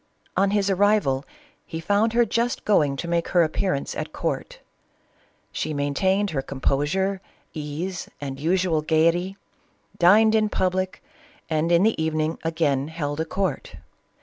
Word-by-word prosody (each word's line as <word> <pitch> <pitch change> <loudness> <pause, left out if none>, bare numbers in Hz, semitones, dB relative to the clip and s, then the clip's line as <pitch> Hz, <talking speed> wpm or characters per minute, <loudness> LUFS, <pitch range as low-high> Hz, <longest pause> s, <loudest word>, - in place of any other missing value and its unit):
On 195 0 +3
his 200 -1 +1
arrival 195 -9 +2 0.4
he 160 - -6
found 205 +6 +1
her 240 0 +4
just 235 +1 -1
going 150 -9 +3
to 170 - -5
make 170 0 0
her 175 -2 +4
appearance 160 -2 -1
at - - -4
court - - -3 0.9
She 155 0 -3
maintained 190 +8 +1
her 140 -4 -1
compo 135 +1 -1
sure, 190 +4 -1 0.3
ease, 160 +4 -5
and 135 -2 -6
usual 170 0 +1
gayety, 170 +5 +1 0.6
dined 215 +5 +6
in 215 -1 +3
public, 185 -1 -1 0.5
and 160 +2 +1
in 170 +2 +5
the 220 -6 +2
evening 155 0 -1
again 155 -4 0
held 150 -2 -4
a 160 - 0
court. 185 -3 -3
170 Hz, 145 wpm, -24 LUFS, 155-195 Hz, 0.9 s, dined